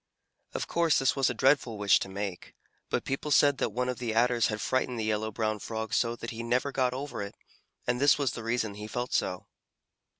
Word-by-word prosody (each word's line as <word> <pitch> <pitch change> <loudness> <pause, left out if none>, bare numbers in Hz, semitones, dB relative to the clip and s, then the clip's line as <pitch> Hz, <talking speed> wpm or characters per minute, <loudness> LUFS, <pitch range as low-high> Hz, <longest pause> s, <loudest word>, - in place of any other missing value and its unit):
Of - - -1
course 170 -2 +2
this 135 - +2
was 135 -2 +2
a - - -1
dreadful 130 -3 +3
wish 100 -1 +4
to - - -5
make, 95 -1 -5 0.3
but - - -1
people 135 +2 -2
said 145 -1 +4
that - - +1
one 125 +1 -2
of 125 -1 -3
the 115 -3 -2
Adders 120 0 +3
had 110 -1 -3
frightened 130 -1 0
the - - -1
Yellow 110 0 0
Brown 110 0 -1
Frog 110 0 -4
so 115 -1 +2
that 115 - -6
he 115 - -5
never 125 +4 0
got 130 -2 +1
over 140 -4 -5
it, 100 0 -6 0.5
and 125 +1 0
this 145 0 +6
was 140 -4 0
the 115 - -6
reason 115 -2 -1
he 105 +1 -7
felt 120 +3 -3
so. 90 - 0
120 Hz, 225 wpm, -29 LUFS, 110-130 Hz, 0.5 s, this